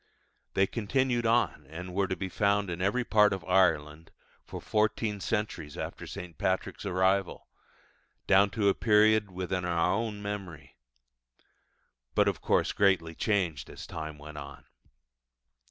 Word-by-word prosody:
They 95 - +4
continued 120 +3 0
on, 115 - +1
and 90 +3 -7
were 100 +1 +1
to 95 - -2
be 95 - -4
found 100 0 +1
in 85 +1 -4
every 105 +7 +1
part 105 -3 +4
of 95 - -5
Ireland 80 -4 +1 0.3
for - - -8
fourteen 105 0 0
centuries 90 -8 -3
after - - -6
St. 90 -2 -8
Patrick's 95 +2 -1
arrival, 95 0 0 0.8
down 100 +1 +5
to 105 -2 +2
a 100 - +5
period 110 -1 +3
within 90 0 -3
our 85 0 +1
own 110 0 -2
memory; 95 -8 -7 1.4
but - - +4
of - - -1
course - - +2
greatly 95 -5 +2
changed 90 -6 -1
as - - -9
time 80 -2 -6
went 75 +1 -9
on. 70 +1 -10
95 Hz, 140 wpm, -29 LUFS, 85-105 Hz, 1.4 s, down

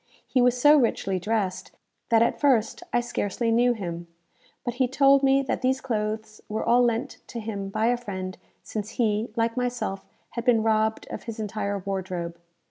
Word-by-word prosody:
He 255 - +1
was 250 0 +3
so 295 +3 +7
richly 195 -6 0
dressed, 200 -1 -2 0.4
that 230 0 +5
at 235 - 0
first 250 -7 +2
I 240 - +2
scarcely 230 -1 -1
knew 240 +2 +4
him; 175 -5 -5 0.6
but 240 - -1
he 255 - +4
told 275 +1 +5
me 275 0 +4
that - - -2
these 260 +1 +1
clothes 215 -3 -3
were 215 +1 -2
all 245 +1 +4
lent 235 -1 0
to 235 - -6
him 205 -3 -4
by 215 +3 0
a 245 +1 +3
friend, 190 -5 -5 0.3
since 215 -1 -5
he, 220 -1 +1
like 230 0 0
myself, 245 -6 -2 0.3
had 235 - -4
been 235 -3 +3
robbed 220 0 +1
of - - -6
his 230 -1 -6
entire 205 -1 -2
wardrobe. 180 -3 -4
225 Hz, 180 wpm, -26 LUFS, 205-245 Hz, 0.6 s, so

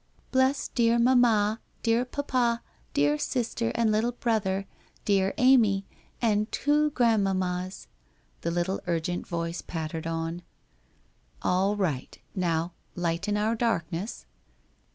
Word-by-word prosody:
' - - -34
Bless 260 +1 +2
dear 235 -1 +2
mamma, 235 -3 +4 0.2
dear 230 +1 +2
papa, 250 -3 0 0.3
dear 145 +1 +2
sister 235 - -1
and 230 -2 +2
little 225 +3 +1
brother, 205 -5 0 0.4
dear 195 -1 +2
Amy, 225 -7 +4 0.3
and 215 -2 +1
two 300 +1 +2
grandmammas 190 -6 +1 0.3
' - - -38
the - - -1
little 175 +3 -1
urgent 175 +1 -1
voice 170 0 -3
pattered 160 -1 -4
on. 165 +1 -3 0.5
' - - -36
All 195 +3 +2
right. 165 -11 -2 0.2
Now 170 -2 0
— - - -39
Lighten 175 +4 -1
our 215 +2 +1
darkness.' 200 -4 -2
205 Hz, 125 wpm, -27 LUFS, 175-235 Hz, 0.5 s, mamma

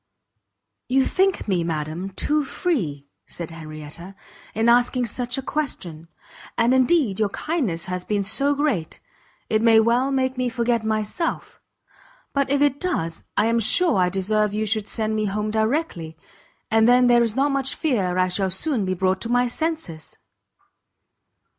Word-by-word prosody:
"You 265 +1 +3
think 385 -6 +1
me, 180 -4 +1
madam, 160 +3 -3
too 295 +10 0
free," 185 - -2 0.2
said 170 -1 -7
Henrietta, 155 +3 -9 0.4
"in 225 +2 +1
asking 245 +1 +3
such 245 +2 -3
a 270 - -3
question; 180 - -4 0.5
and 235 +2 +3
indeed 260 - +2
your 210 -2 +2
kindness 225 - -2
has 180 -1 -4
been 205 0 -1
so 275 +8 +1
great, 270 - -1 0.5
it 215 0 +1
may 225 -1 +6
well 240 +4 +2
make 260 -1 0
me 250 -1 0
forget 235 -1 0
myself: 220 - -3 0.7
but 280 -1 0
if 280 +1 +3
it 285 -1 +1
does, 165 - -2
I - - +4
am 230 +1 +2
sure 250 - +3
I 180 -1 +3
deserve 210 +2 0
you 215 +1 0
should 215 0 0
send 220 -1 -2
me 215 0 0
home 210 +1 -2
directly, 220 - -1 0.5
and 220 0 +4
then 250 +1 +5
there 240 -1 +5
is 230 -2 +1
not 280 +2 +2
much 275 +1 -1
fear 200 - 0
I 185 0 +3
shall 190 +1 -1
soon 220 - -1
be 185 0 -1
brought 190 +1 0
to 230 - -4
my 245 +1 +3
senses!" 250 - -4
220 Hz, 160 wpm, -23 LUFS, 190-265 Hz, 0.7 s, may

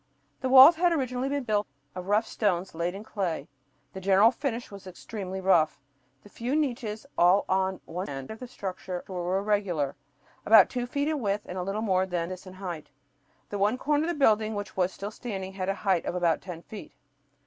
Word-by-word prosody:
The 260 - -2
walls 270 +5 +9
had 350 +1 +3
originally 260 -4 -1
been 285 -1 -1
built 210 -3 0 0.3
of 180 0 -7
rough 210 +3 +2
stones 190 -5 -1
laid 170 +3 -2
in 200 - -7
clay. 175 -9 -3 0.5
The 190 - -7
general 195 +4 +5
finish 245 -3 -4
was 200 -1 -10
extremely 190 +1 -6
rough. 170 -5 +3 0.4
The - - -14
few 240 +6 -3
niches, 240 -7 -2
all 180 +3 +5
at 190 0 0
one 180 +3 -5
end 135 +2 -6
of 220 - -8
the 250 - -7
structure, 185 -5 -6
were 180 0 -2
irregular, 195 -8 0 0.5
about 215 -3 +7
two 245 -1 -2
feet 285 +3 -1
in 310 -1 0
width 205 -3 -1
and 180 - -6
a - - -1
little 195 +4 -3
more 190 -3 +1
than 175 -2 -2
this 185 0 -8
in 185 - -10
height. 180 -5 -7 0.6
The 205 - -4
one 210 +5 +2
corner 295 +3 +1
of - - -2
the 345 - -1
building 220 -6 +3
which 205 -2 -5
was 185 0 +1
still 200 +2 -6
standing 195 -5 -6
had 190 -1 -3
a 195 - 0
height 190 -4 +2
of - - -2
about 170 -2 +1
ten 175 -2 -8
feet. 215 - -10
200 Hz, 205 wpm, -27 LUFS, 185-230 Hz, 0.6 s, walls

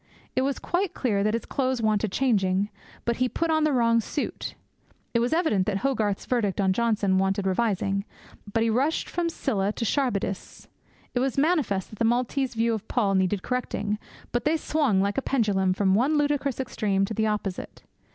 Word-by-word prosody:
It 255 - +3
was 275 +1 0
quite 360 +1 -1
clear 205 -6 +1
that 215 +2 +1
his 230 - -3
clothes 260 -2 -1
wanted 215 -2 +1
changing, 200 -5 +1 0.4
but 235 -1 0
he 255 0 +1
put 330 +4 -1
on 315 -1 +3
the 305 - +2
wrong 230 -3 +3
suit. 275 +6 -4 0.6
It 235 - +3
was 240 +1 +1
evident 315 - +2
that 200 -2 +1
Hogarth's 215 -7 0
verdict 215 -7 0
on 190 -1 +3
Johnson 210 -4 +2
wanted 195 +1 0
revising, 195 -1 0 0.5
but 225 +1 +2
he 230 - +2
rushed 275 +8 +1
from 340 -1 -1
Scylla 205 -11 -1
to 230 - -3
Charybdis. 210 -7 -2 0.5
It 245 - +1
was 265 +1 0
manifest 280 - +1
that 215 - -11
the 230 - +2
Maltese 250 +2 0
view 230 +1 +2
of 220 - -4
Paul 210 -6 +1
needed 190 0 +1
correcting, 210 -4 -2 0.3
but 240 - 0
they 305 +2 +2
swung, 280 -12 +1
like 200 +5 0
a - - -4
pendulum, 205 -9 +1
from 190 0 +2
one 265 +9 +3
ludicrous 290 -3 0
extreme 205 -6 0
to 220 - -5
the 220 +1 +1
opposite. 210 -3 -4
230 Hz, 190 wpm, -26 LUFS, 200-265 Hz, 0.6 s, It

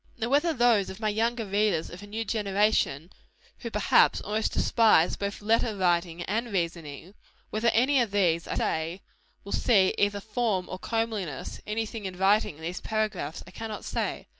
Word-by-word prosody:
Now 235 0 -2
whether 295 +5 +3
those 240 - +3
of 190 - -8
my 215 -1 0
younger 225 +2 0
readers 200 -4 0
of 175 - -9
a 205 - -10
new 220 +2 -4
generation, 200 -7 0 0.5
who, 235 - -5
perhaps, 210 -2 +3
almost 215 +2 -1
despise 220 -8 +3
both 200 +1 -5
letter 225 0 +1
writing 175 -2 0
and 225 +5 -2
reasoning, 170 -2 -4 0.4
whether 220 +2 0
any 260 +3 +3
of 235 - 0
these, 175 -5 +1
I - - -3
say, 165 +4 -2 0.4
will 200 - -9
see 200 -6 +3
either 205 0 +2
form 210 -3 -1
or 185 - -6
comeliness 215 - -3
any 220 +2 -1
thing 215 -1 -7
inviting 190 -1 +1
in 160 - -14
these 175 +2 -4
paragraphs, 215 -8 -2
I 175 - -13
cannot 220 +1 -6
say. - - -3
205 Hz, 170 wpm, -27 LUFS, 180-225 Hz, 0.5 s, whether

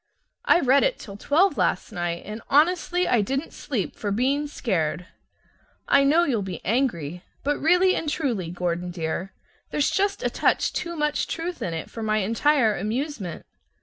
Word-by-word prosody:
I 345 - +5
read 270 +1 +4
it - - +1
till 200 - -10
twelve 320 - +2
last - - 0
night, 175 -3 -3
and 215 +2 -7
honestly 355 +4 +3
I 235 - +3
didn't 270 +9 -3
sleep 210 - -3
for 205 - -3
being 270 +8 +1
scared. 175 - -2 0.8
I 280 - +5
know 310 +5 +4
you'll 245 -10 0
be 185 -4 -5
angry, 180 - -1 0.2
but 290 +1 0
really 360 +4 +4
and 310 - -2
truly, 240 - -1
Gordon 175 0 -2
dear, 175 +2 -3 0.4
there's 295 - +1
just 400 +4 0
a - - +1
touch - - +1
too 340 -1 -3
much 300 -1 0
truth 340 +1 -4
in 165 - -2
it 160 - -5
for 225 - -8
my 215 -1 +1
entire 230 +3 +2
amusement. 220 - -4
245 Hz, 170 wpm, -24 LUFS, 185-300 Hz, 0.8 s, I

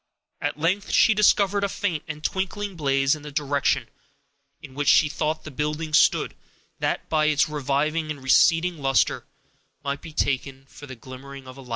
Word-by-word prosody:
At 145 0 -2
length 185 +6 0
she 220 - +5
discovered 200 -1 +3
a 200 - 0
faint 175 -6 -2
and 155 -1 -7
twinkling 195 +2 -3
blaze 135 -3 +1
in 155 - -11
the 150 0 -9
direction 145 -1 0 0.7
in 135 -3 -12
which 145 +1 -3
she 150 - +6
thought 155 +1 -2
the 155 - -9
building 150 +3 -3
stood, - - +3 0.5
that, - - -2
by 155 -1 +1
its 155 -1 +3
reviving 150 +2 -1
and 145 -3 -6
receding 165 +5 +3
luster, 135 -2 +1 0.6
might 140 0 -3
be 165 - -10
taken 135 -2 -2
for 145 +2 -13
the 130 - -8
glimmering 130 +3 -11
of 130 +1 -11
a - - -9
fire. 125 - -16
150 Hz, 180 wpm, -24 LUFS, 135-165 Hz, 0.7 s, she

